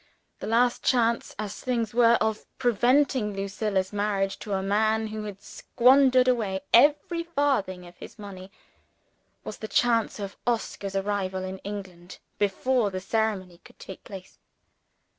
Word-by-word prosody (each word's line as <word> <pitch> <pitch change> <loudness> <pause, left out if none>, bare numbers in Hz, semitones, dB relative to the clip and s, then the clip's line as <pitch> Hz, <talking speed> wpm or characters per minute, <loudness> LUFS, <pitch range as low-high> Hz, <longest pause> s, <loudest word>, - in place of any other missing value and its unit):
The - - -6
last 240 +2 +2
chance, 235 -2 +1
as 210 -1 -5
things 235 -4 -1
were, 235 0 +5
of 220 0 -1
preventing 245 -2 +2
Lucilla's 195 0 -2
marriage 200 -1 -1
to 205 - -5
a 190 0 -1
man 220 +2 +1
who 215 0 -5
had 200 -1 -8
squandered 255 0 +3
away 210 -7 0
every 295 +6 +4
farthing 275 - -1
of 175 0 -15
his - - -11
money, 195 -2 -10 0.9
was 215 - -7
the 215 - -5
chance 230 +2 +1
of 200 -2 -7
Oscar's 205 -4 -2
arrival 195 -1 -2
in 190 0 -6
England 185 -4 -8 0.2
before 210 +3 +1
the 185 -1 -4
ceremony 195 -3 -2
could - - -18
take 190 - -10
place. 190 -2 -11
210 Hz, 140 wpm, -26 LUFS, 195-240 Hz, 0.9 s, were